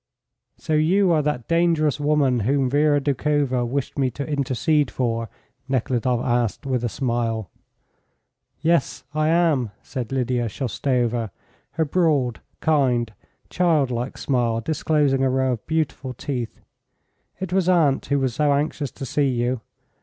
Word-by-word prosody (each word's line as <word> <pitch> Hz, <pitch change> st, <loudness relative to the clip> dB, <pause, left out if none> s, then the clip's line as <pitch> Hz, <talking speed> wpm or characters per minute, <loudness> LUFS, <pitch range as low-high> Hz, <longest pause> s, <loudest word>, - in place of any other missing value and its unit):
"So 160 Hz, -, -3 dB
you 175 Hz, +5 st, +3 dB
are 160 Hz, -2 st, +3 dB
that 150 Hz, -5 st, -2 dB
dangerous 165 Hz, -4 st, +2 dB
woman 145 Hz, -4 st, +2 dB
whom 130 Hz, +3 st, +1 dB
Vera 145 Hz, 0 st, +3 dB
Doukhova 140 Hz, -2 st, 0 dB
wished 140 Hz, +3 st, -3 dB
me 130 Hz, -2 st, +2 dB
to 140 Hz, +3 st, -5 dB
intercede 145 Hz, 0 st, +1 dB
for?" 115 Hz, -3 st, -2 dB, 0.4 s
Nekhludoff 125 Hz, -1 st, 0 dB
asked, 120 Hz, -2 st, 0 dB
with 130 Hz, -3 st, -1 dB
a 120 Hz, -, 0 dB
smile. 115 Hz, -, -2 dB, 1.1 s
"Yes, 165 Hz, -5 st, +1 dB
I 155 Hz, 0 st, +1 dB
am," 160 Hz, -8 st, +2 dB
said 125 Hz, -4 st, -5 dB
Lydia 125 Hz, -2 st, 0 dB
Shoustova, 120 Hz, -1 st, -1 dB, 0.4 s
her 160 Hz, 0 st, +1 dB
broad, 145 Hz, -7 st, +1 dB, 0.2 s
kind, 125 Hz, -7 st, +2 dB, 0.4 s
child 160 Hz, -7 st, +2 dB
like 120 Hz, +2 st, -3 dB
smile 120 Hz, -4 st, 0 dB
disclosing 145 Hz, 0 st, +1 dB
a 135 Hz, -, +3 dB
row 130 Hz, 0 st, +1 dB
of 115 Hz, -4 st, -5 dB
beautiful 150 Hz, -5 st, -2 dB
teeth. 125 Hz, -4 st, -5 dB, 0.8 s
"It 185 Hz, -1 st, -4 dB
was 185 Hz, -1 st, +2 dB
aunt 155 Hz, -7 st, +3 dB
who 140 Hz, -, +1 dB
was 130 Hz, -3 st, 0 dB
so 145 Hz, +2 st, +2 dB
anxious 145 Hz, 0 st, -1 dB
to 135 Hz, -, -8 dB
see 140 Hz, +3 st, +1 dB
you. 120 Hz, -1 st, -1 dB
135 Hz, 140 wpm, -23 LUFS, 125-150 Hz, 1.1 s, you